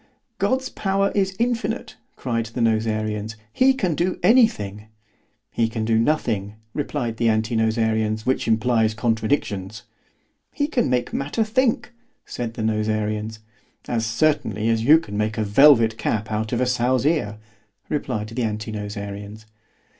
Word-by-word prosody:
God's 260 0 0
power 195 0 0
is 195 -1 0
infinite, 235 0 -2 0.2
cried 115 -3 -2
the 115 +3 -7
Nosarians, 110 -1 0 0.2
he 260 +1 +5
can 185 -10 0
do 175 +4 -1
any 235 0 +7
thing. 105 - -8 0.6
He 115 -1 +1
can 110 -1 -3
do 110 0 +2
nothing, 110 -7 0 0.2
replied 130 -6 -3
the 115 -1 +2
Anti 110 +1 0
nosarians, 110 -1 0
which 130 -2 0
implies 110 -1 +2
contradictions. 110 -3 -1 0.7
He 285 - -1
can 260 - 0
make 125 -1 0
matter 145 +11 -1
think, 240 +2 0 0.3
said 115 -2 -5
the 110 - -3
Nosarians. 110 0 -1 0.5
As 115 -2 -1
certainly 115 -4 +1
as 115 -1 +1
you 150 +6 +7
can 105 -11 -6
make 110 +1 -1
a 110 - +1
velvet 115 0 +5
cap 110 0 -2
out 110 0 -2
of 120 - 0
a - - +3
sow's 125 +1 +1
ear, 145 -10 0 0.5
replied 120 -8 -3
the 120 +3 -4
Anti 110 -1 -3
nosarians. 105 0 -6
115 Hz, 145 wpm, -22 LUFS, 110-145 Hz, 0.7 s, any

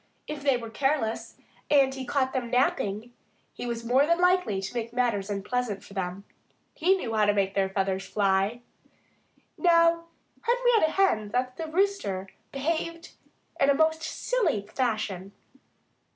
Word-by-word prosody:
If 300 -1 -6
they 275 -3 +3
were 230 -2 -8
careless, 270 -3 -1 0.3
and 275 -2 +4
he 265 -1 -6
caught 265 -2 0
them 255 -3 -2
napping, 235 -3 0 0.4
he - - -6
was 235 -1 -4
more 260 +5 +3
than 340 +1 +2
likely 360 - +2
to 195 +3 -5
make 230 -1 -3
matters 235 -5 0
unpleasant 205 +1 -2
for - - -14
them. 185 0 -4 0.5
He 365 +4 +3
knew 235 -10 -4
how 215 -1 +3
to 205 0 +2
make 195 -1 +1
their 195 -1 +1
feathers 195 0 -1
fly. 200 +3 +1 1.0
Now, 335 -1 +4 0.4
Henrietta 475 -8 +2
Hen 220 - +2
thought 250 +3 -1
that 330 - -4
the - - -10
Rooster 320 - 0 0.2
behaved 335 +4 -3 0.5
in 275 - +4
a 280 - +5
most 320 +1 +2
silly 315 - -1
fashion. 215 -6 -2
250 Hz, 150 wpm, -27 LUFS, 205-315 Hz, 1.0 s, a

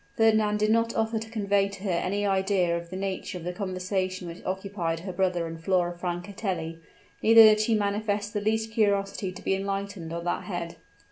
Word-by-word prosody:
Fernand 215 -2 +4
did 215 +1 +2
not 230 +1 +2
offer 225 0 0
to 220 0 -8
convey 200 -3 +1
to 200 -1 -10
her 195 - 0
any 195 +4 0
idea 190 -3 +2
of 170 0 -5
the 185 - -7
nature 190 0 -3
of 175 - -9
the 180 +1 -3
conversation 185 -1 -2
which 170 +1 -9
occupied 185 -3 -2
her 185 0 -6
brother 180 -3 0
and 165 0 -7
Flora 175 -1 +1
Francatelli; 175 -1 -4 0.4
neither 225 0 +9
did 215 -1 +7
she 220 +1 +2
manifest 205 0 -1
the 205 - -1
least 220 +1 0
curiosity 200 -3 +1
to 185 - -11
be - - +1
enlightened 195 -3 -3
on 170 0 -4
that 175 - -2
head. 170 -3 -5
195 Hz, 195 wpm, -27 LUFS, 180-210 Hz, 0.4 s, neither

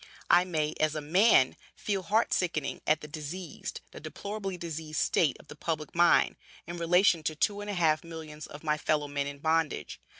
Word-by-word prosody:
I 180 - +6
may, 155 -4 -1
as 155 0 +2
a - - -1
man, 160 - +4 0.2
feel 200 -2 -2
heart 215 +5 +1
sickened 165 -6 -1
at 155 0 +3
the 150 - -8
diseased, 155 +2 -6
the - - -10
deplorably 200 -2 -5
diseased 160 -2 -4
state 155 -6 +2
of - - -17
the - - -10
public 155 -1 -3
mind, 175 0 +4 0.3
in 170 +1 -6
relation 175 +1 +4
to 155 0 -2
two 205 +6 0
and 205 - -6
a 205 - -2
half 160 -3 +2
millions 160 -2 -8
of 145 - -11
my 150 -1 0
fellow 150 -1 0
men 140 0 -2
in 145 0 -6
bondage. 160 0 -1
160 Hz, 195 wpm, -29 LUFS, 150-180 Hz, 0.3 s, I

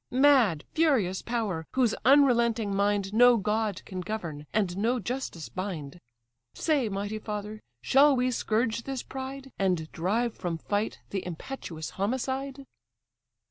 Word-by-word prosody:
Mad, 255 - +4
furious 255 - +2
power! 210 -9 -2
whose 250 -4 +3
unrelenting 235 -6 +4
mind 200 0 +1
No 245 +1 +7
god 210 -1 -1
can 185 -1 -5
govern, 170 -7 -5
and 195 -5 0
no 230 +6 +1
justice 235 - -4
bind. 180 -5 -5 0.6
Say, 285 -8 +1
mighty 205 +2 -3
father! 210 0 -5 0.2
shall 280 +1 +5
we 255 0 +1
scourge 225 0 0
this 270 0 -4
pride, 270 0 -7
And 180 -5 0
drive 215 +7 0
from 175 -3 -3
fight 205 +5 -2
the 195 -2 -2
impetuous 170 - -6
homicide?" 265 +5 -2
215 Hz, 130 wpm, -28 LUFS, 190-255 Hz, 0.6 s, No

